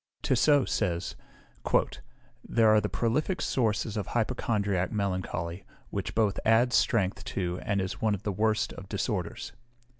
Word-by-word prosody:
Tissot 135 +2 +4
says, 90 -4 -1 1.3
"They 115 - +1
are 110 -1 +6
the - - -2
prolific 150 +10 0
sources 110 -3 0
of 105 -4 -3
hypochondriac 105 -6 0
melancholy, 95 -3 -2 0.3
which - - -4
both 110 -3 +2
adds 120 +3 +4
strength 100 -8 +2
to 90 -2 -2
and 100 -1 0
is 95 -1 -3
one 110 -2 +2
of 100 - -10
the 105 - -1
worst 110 +2 0
of - - -10
disorders." - - -3
105 Hz, 140 wpm, -28 LUFS, 95-115 Hz, 1.3 s, are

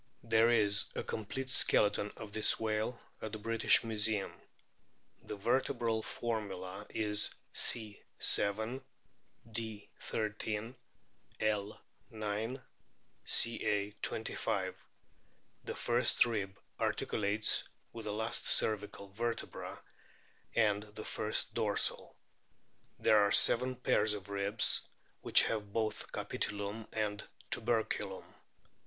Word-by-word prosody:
There 115 0 +3
is 105 -3 +4
a - - -3
complete 130 +5 -5
skeleton 105 -3 +3
of 105 - -9
this 110 - +3
whale 110 +2 -2 0.2
at 110 - -6
the - - -3
British 115 +1 +3
Museum. 110 -2 0 0.9
The - - -7
vertebral 115 +1 0
formula 100 -4 -5
is 105 -1 +2 0.2
C. 110 -3 +1 0.2
7; 110 +6 +3 0.7
D. 110 -2 -3
13; 110 +2 -3 0.7
L. 105 -1 -1 0.3
9; 110 +4 -4 0.6
Ca. 105 -3 +2
25. 100 -3 -2 0.9
The - - -4
first 120 0 +2
rib 100 -5 -3 0.2
articulates 105 +1 +1 0.3
with 115 -1 -8
the 105 - -3
last 110 +2 0
cervical 105 -2 +4
vertebra 115 +4 -5 0.7
and 105 -3 +2
the 105 0 -9
first 105 0 -1
dorsal. - - -1 0.8
There 110 - +4
are 100 0 +3
seven 130 +2 +5
pairs 110 -3 +2
of 100 -1 -9
ribs 100 +2 +2 0.4
which - - +6
have 105 -2 -3
both 110 -1 -2
capitulum 105 +2 -4
and 105 -2 -2 0.3
tuberculum. 115 -1 -1
110 Hz, 100 wpm, -33 LUFS, 105-115 Hz, 0.9 s, which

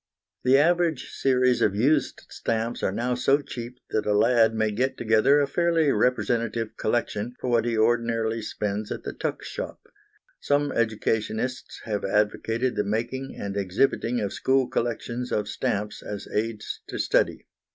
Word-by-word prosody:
The 130 +2 +5
average 165 -2 +2
series 125 -2 +2
of 100 - +2
used 140 +6 +1
stamps 115 +1 -2
are - - +1
now 120 +5 -1
so 135 +3 +3
cheap 125 -3 -7
that 110 - 0
a 105 -1 +3
lad 115 0 +4
may 110 -1 +1
get 125 +6 -1
together 115 +6 +4
a 145 - +3
fairly 165 0 +2
representative 115 -1 0
collection 120 0 -1
for 125 - -2
what 115 -1 +3
he 115 -2 0
ordinarily 115 0 +1
spends 105 0 -3
at - - -4
the - - -5
tuck - - -3
shop. - - -6 0.6
Some 145 0 +1
educationists 110 +2 -1
have 105 -3 -2
advocated 110 +4 0
the - - +1
making 120 +6 -3
and 100 -1 -4
exhibiting 110 +5 +1
of 100 - -2
school 130 -1 +2
collections 120 +1 -3
of 105 -1 0
stamps 105 0 -2
as 105 -1 -6
aids 110 0 -2
to - - -5
study. - - +1
115 Hz, 155 wpm, -26 LUFS, 110-130 Hz, 0.6 s, The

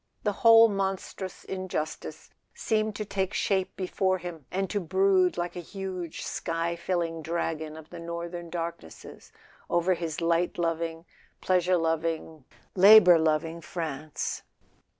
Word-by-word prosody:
The 210 - +1
whole 230 -1 +8
monstrous 195 -2 -4
injustice 185 -5 -5 0.2
seemed 215 -1 0
to 215 - -4
take 195 0 -2
shape 190 -2 0
before 185 0 0
him, 170 -5 -8
and 195 +1 -1
to 205 - 0
brood 185 0 +2
like 175 0 -3
a - - -4
huge 185 -2 -6
sky 165 +1 -2
filling 170 -1 -2
dragon 160 -1 -3
of 160 0 -13
the 175 - -8
northern 170 0 -6
dark¬ 170 0 -4
nesses 80 - -13 0.4
over 175 +2 +2
his 165 -3 -4
light 170 +1 +1
loving, 165 -1 -2 0.3
pleasure 180 0 +2
loving, 160 -2 -2 0.3
labour 190 -3 +8
loving 160 +1 0
France. 155 -3 -4
175 Hz, 130 wpm, -27 LUFS, 165-190 Hz, 0.4 s, whole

